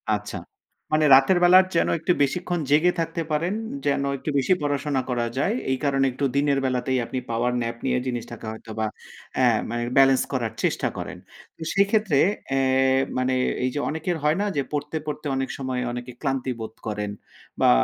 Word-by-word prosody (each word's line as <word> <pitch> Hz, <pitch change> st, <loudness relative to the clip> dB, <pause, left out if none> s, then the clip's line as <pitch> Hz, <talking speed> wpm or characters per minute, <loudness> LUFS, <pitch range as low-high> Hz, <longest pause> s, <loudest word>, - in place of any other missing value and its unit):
আচ্ছা। 105 Hz, -1 st, -6 dB, 0.6 s
মানে 155 Hz, 0 st, +4 dB
রাতের 135 Hz, +7 st, +5 dB
বেলার 185 Hz, +1 st, +7 dB
যেন -, -, +3 dB
একটু 180 Hz, -, +1 dB
বেশিক্ষণ 175 Hz, +5 st, 0 dB
জেগে 155 Hz, +5 st, +5 dB
থাকতে 165 Hz, 0 st, -2 dB
পারেন, 170 Hz, +6 st, 0 dB, 0.3 s
যেন 140 Hz, -1 st, +1 dB
একটু 150 Hz, -, -5 dB
বেশি 140 Hz, +7 st, +3 dB
পড়াশোনা 145 Hz, -1 st, 0 dB
করা 120 Hz, -1 st, 0 dB
যায়। 200 Hz, -, +1 dB, 0.2 s
এই 130 Hz, -, +1 dB
কারণে 135 Hz, -1 st, +2 dB
একটু 140 Hz, +3 st, -2 dB
দিনের 140 Hz, -1 st, +2 dB
বেলাতেই 130 Hz, 0 st, 0 dB
আপনি 130 Hz, -, -3 dB
পাওয়ার 120 Hz, +2 st, 0 dB
ন্যাপ 115 Hz, 0 st, -3 dB
নিয়ে -, -, +1 dB
জিনিসটাকে 120 Hz, -2 st, -5 dB
হয়তো 110 Hz, 0 st, -10 dB
বা 110 Hz, -, +1 dB, 0.6 s
আ -, -, +4 dB, 0.3 s
মানে 120 Hz, 0 st, -2 dB
বেলেন্স 135 Hz, -1 st, +6 dB
করার 115 Hz, -4 st, -1 dB
চেষ্টা -, -, +1 dB
করেন। -, -, -6 dB, 0.4 s
তো -, -, -18 dB
সেক্ষেত্রে 200 Hz, -6 st, +3 dB, 0.4 s
আ -, -, +3 dB, 0.6 s
মানে 130 Hz, 0 st, +1 dB, 0.3 s
এই 130 Hz, -, +2 dB
যে 145 Hz, -, -2 dB
অনেকের 160 Hz, +2 st, -2 dB
হয় 155 Hz, +4 st, +2 dB
না -, -, +1 dB
যে, 140 Hz, -, +2 dB
পড়তে, 150 Hz, +2 st, -2 dB
পড়তে 150 Hz, 0 st, -5 dB
অনেক 135 Hz, 0 st, -2 dB
সময় 130 Hz, -2 st, -2 dB
অনেকে 125 Hz, +1 st, -6 dB
ক্লান্তি 135 Hz, -2 st, -1 dB
বোধ 110 Hz, 0 st, -6 dB
করেন 105 Hz, -1 st, -3 dB, 0.5 s
বা -, -, +6 dB
135 Hz, 180 wpm, -24 LUFS, 125-155 Hz, 0.6 s, বেলার